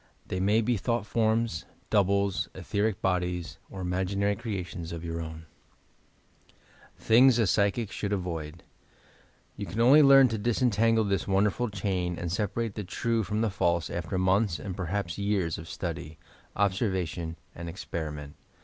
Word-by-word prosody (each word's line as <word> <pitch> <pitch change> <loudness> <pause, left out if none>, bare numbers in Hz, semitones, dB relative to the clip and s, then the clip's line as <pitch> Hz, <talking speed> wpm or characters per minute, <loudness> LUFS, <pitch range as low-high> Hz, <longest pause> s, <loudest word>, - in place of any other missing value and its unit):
They 95 - -3
may 105 +4 +3
be 120 +1 +1
thought 115 +2 -1
forms, 110 -5 0 0.3
doubles, 100 -3 +2
etberic 100 +2 -1
bodies, 90 -2 -1
or 95 - -7
imaginary 95 +3 0
creations 95 -6 -5
of 85 0 -6
your 85 0 -3
own, 80 0 -7 1.5
THINGS 120 +2 +5
A 115 - +3
PSYCHIC 100 +2 +1
SHOUU) 100 -1 -2
AVOID 80 -2 -5 1.0
You - - -5
can 110 - -5
only 130 +6 +7
learn 135 -2 +8
to 110 -1 -2
disentangle 115 -1 +2
this 100 -2 -1
wonderful 100 +5 +1
chain 95 -3 -2
and 85 -1 -3
separate 105 +3 -1
the 105 - -5
true 115 +5 -1
from 105 +1 -2
the 115 -3 +1
false 85 -4 0
after 85 +2 -3
months 95 0 +2
and 90 +6 -6
perhaps 95 0 -3
years 100 -5 0
of 80 - -9
study, 75 +1 -5 0.4
observation 95 -5 -1 0.2
and 85 0 -7
experiment. 75 -5 -6
100 Hz, 145 wpm, -28 LUFS, 85-110 Hz, 1.5 s, learn